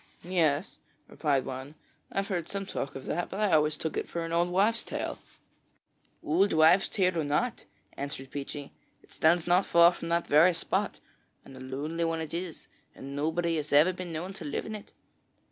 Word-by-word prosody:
'Yes,' 165 -2 0 0.3
replied 140 -4 0
one; 135 +3 -6 0.4
'I've 195 0 -2
heard 175 -4 -2
some 195 0 -3
talk 140 -6 -4
of 135 - -7
that, 175 +2 -2
but 195 - -5
I 210 -3 +2
always 150 -1 +3
took 160 - -3
it - - -3
for 170 -1 -3
an 165 - -6
old 170 +1 +2
wives' 210 +6 +2
tale.' - - -4 1.0
'Old 190 +7 +2
wives' 160 +4 +5
tale 185 -4 +1
or - - +1
not,' 150 +12 -1 0.3
answered 135 -2 -6
Peechy, 145 0 -6 0.3
'it - - -23
stands 160 +1 +3
not 180 +2 +3
far 170 0 +7
from 170 -1 -6
that 170 0 +1
very 165 +4 +5
spot 165 - -2 0.5
and 135 - -12
a - - -10
lonely 145 +6 -3
one 165 0 0
it 160 -1 -5
is, 170 -1 -5 0.3
and 140 +1 -8
nobody 160 +3 0
has 150 -1 -4
ever 155 +6 +5
been 180 -1 -6
known 170 +4 -4
to 180 - -9
live 145 -2 -3
in 220 - -6
it. 210 -1 -9
165 Hz, 195 wpm, -29 LUFS, 150-180 Hz, 1.0 s, far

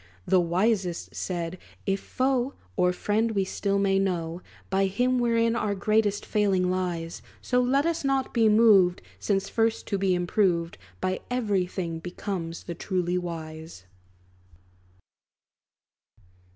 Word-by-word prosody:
The 185 - +4
wisest 180 +1 0
said, 175 -1 -4 0.3
"If 195 0 0
foe 260 +2 0 0.2
Or 180 0 +3
friend, 215 +5 0
we 195 -2 +1
still 200 +1 -1
may 195 -1 +2
know 175 -3 -2 0.3
By 195 0 +3
him, 250 +6 +1
wherein 230 -1 +2
our 210 -3 0
greatest 205 0 +1
failing 190 -4 +1
lies. 175 -3 -3 0.2
So, 250 -1 +1
let 270 +4 +2
us 335 -2 0
not 270 -1 0
be 225 -2 +4
moved, 205 -5 +5 0.2
Since 195 -1 0
first 225 0 0
to 200 - 0
be 190 -1 +2
improved 175 -2 0 0.2
By 185 0 -1
every 205 -7 0
thing, 170 -3 -4
becomes 175 -1 -5
the 170 - -5
truly 180 0 -1
wise." 160 - -7
195 Hz, 130 wpm, -26 LUFS, 180-225 Hz, 0.3 s, moved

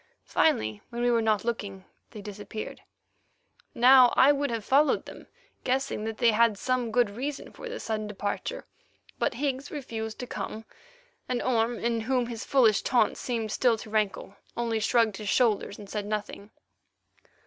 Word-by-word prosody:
Finally, 110 -1 +1
when 240 0 -4
we 245 - +3
were 230 -1 +3
not 220 -1 +1
looking, 200 -5 -4 0.2
they 210 -3 -10
disappeared. 210 +1 -7 0.9
Now 250 0 +7
I 270 +2 +7
would 285 0 0
have 230 -3 -3
followed 285 +3 +3
them, - - -11 0.4
guessing 260 -4 -1
that 220 0 -4
they 235 - +4
had 225 -1 +3
some 250 0 -1
good 240 -2 +2
reason 270 +7 -5
for - - -9
this - - -6
sudden 215 -1 -2
departure. 205 0 -4 0.5
But - - 0
Higgs 275 0 -2
refused 225 -7 -5
to 250 - -5
come, 215 0 -6 0.6
and 250 -1 0
Orme, 235 -1 +1
in 230 0 -1
whom 250 +2 0
his 230 -1 -6
foolish 230 -7 +4
taunt 235 -5 +2
seemed 225 -4 -3
still 240 -1 +2
to 215 - -10
rankle, 210 -2 -1 0.2
only 230 -2 0
shrugged 220 -2 +2
his 210 -2 -5
shoulders 220 -5 +1
and 205 - -10
said 205 0 -4
nothing. 210 -1 -4
230 Hz, 165 wpm, -27 LUFS, 215-250 Hz, 0.9 s, Now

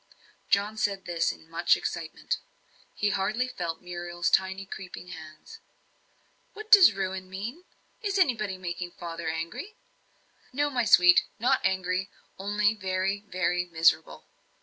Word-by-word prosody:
John 205 +2 +1
said 200 -3 -1
this 170 -1 0
in 160 - -14
much 165 +1 +2
excitement. 160 -1 -4 0.6
He 205 0 +1
hardly 215 +6 0
felt 175 -10 -5
Muriel's 175 0 -3
tiny 190 +1 +1
creeping 185 -2 -9
hands. 160 - -11 0.9
"What 430 0 -10
does 390 - +9
'ruin' 190 -1 -4
mean? 230 - -6 0.4
Is 400 -3 -1
anybody 220 - +1
making 175 -1 -5
father 170 -1 -6
angry?" 165 - -5 0.8
"No, 290 +2 0
my 245 -3 0
sweet 180 -3 +7
not 250 +4 +2
angry 190 0 0 0.3
only 205 +2 +1
very, 190 -1 -1
very 180 -1 0
miserable!" 165 -2 +1
190 Hz, 125 wpm, -27 LUFS, 175-215 Hz, 0.9 s, does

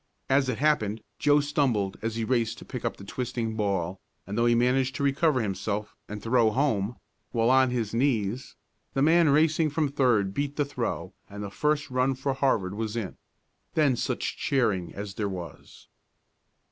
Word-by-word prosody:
As 135 -1 +3
it 120 - -1
happened, 110 -8 +1 0.2
Joe 145 0 +4
stumbled 130 -9 0
as 115 0 -2
he 115 - -1
raced 115 -1 0
to - - -11
pick - - -6
up - - -2
the - - -11
twisting 115 +1 -3
ball, 95 -4 -1 0.2
and 100 - -5
though 115 +1 +3
he 120 - +4
managed 130 +2 +2
to 140 - -2
recover 140 0 +2
himself, 105 0 -3
and 105 0 -6
throw 115 -1 +3
home, 115 -3 0 0.4
while 115 0 +2
on 130 0 +5
his 115 -4 -2
knees, 120 -2 0 0.4
the 135 - +2
man 165 +1 +5
racing 155 +2 +3
from 150 0 0
third 120 -8 +2
beat 145 +3 -2
the 145 - +1
throw 105 - -4 0.2
and 105 0 -7
the 100 - -6
first 150 +2 0
run 130 +1 +1
for 135 +1 -1
Harvard 120 -9 +1
was 110 +1 -3
in. 110 -5 -4 0.6
Then 145 -5 +3
such - - -2
cheering 105 -11 0
as 100 0 -6
there 105 0 -2
was! 90 -3 -9
120 Hz, 180 wpm, -27 LUFS, 105-140 Hz, 0.6 s, on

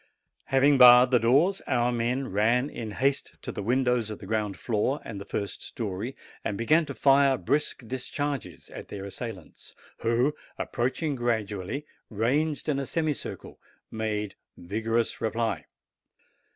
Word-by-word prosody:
Having 135 +1 +4
barred 125 0 +9
the 125 - +5
doors, 145 - +3
our 120 -1 +2
men 120 +2 -1
ran 115 +7 +2
in 115 -2 -5
haste 135 +6 0
to - - -4
the - - -5
windows 125 0 +1
of 105 - -5
the - - -11
ground 105 -3 -1
floor 120 +5 0
and 100 -3 -6
the - - -7
first 100 0 -4
story, 110 +3 -5 0.3
and 100 - -2
began 155 +8 +3
to 140 - -6
fire 135 +2 +4
brisk 145 -4 -1
discharges 140 +2 -4
at - - -8
their 100 -1 -7
assailants, 100 -3 -8 0.2
who, 120 +6 +1 0.2
approaching 135 +5 -1
gradually, 110 +1 -2 0.2
ranged 140 +9 0
in 145 -3 +1
a 135 - -3
semicircle, 155 -3 -3 0.3
made 105 -2 -2 0.2
vigorous 110 +5 -1
reply. 115 0 -1
120 Hz, 140 wpm, -27 LUFS, 110-135 Hz, 0.3 s, barred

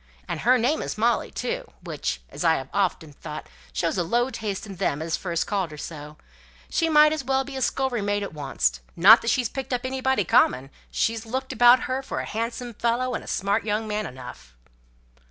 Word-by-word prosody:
And - - -3
her 255 +2 +4
name 255 +7 +1
is - - -4
Molly 235 +2 +1
too, - - -4
which, - - -3
as - - -5
I 165 -1 +4
have 135 -2 -5
often 175 -6 -1
thought, 150 +1 -8 0.3
shows 120 - -1
a - - +2
low 240 +9 +1
taste 215 -4 -4
in 195 -3 -9
them 145 - 0
as 160 +1 -1
first 170 -3 -2
called 195 -4 -1
her 150 - -10
so; 150 0 -8 0.5
she 330 -1 +1
might 300 0 +6
as 310 -3 -3
well 265 +1 +1
be 275 0 -9
a 265 - -3
scullery 260 -3 0
maid 205 0 0
at 200 - -5
oncest. 130 - -1 0.2
Not 205 +7 +8
that 230 - -1
she's 255 -3 +2
picked 265 +2 -5
up 245 - 0
anybody 265 -3 0
common; 135 -5 +3 0.2
she's 225 0 0
looked 260 +3 -3
about 245 +1 +7
her 260 +1 -2
for 270 - -4
a - - -3
handsome 230 +2 -4
fellow, 240 +3 0
and - - -3
a - - -14
smart 200 +3 0
young 215 +1 -1
man 210 0 -2
enough!" 125 - -11
220 Hz, 210 wpm, -25 LUFS, 170-255 Hz, 0.5 s, Not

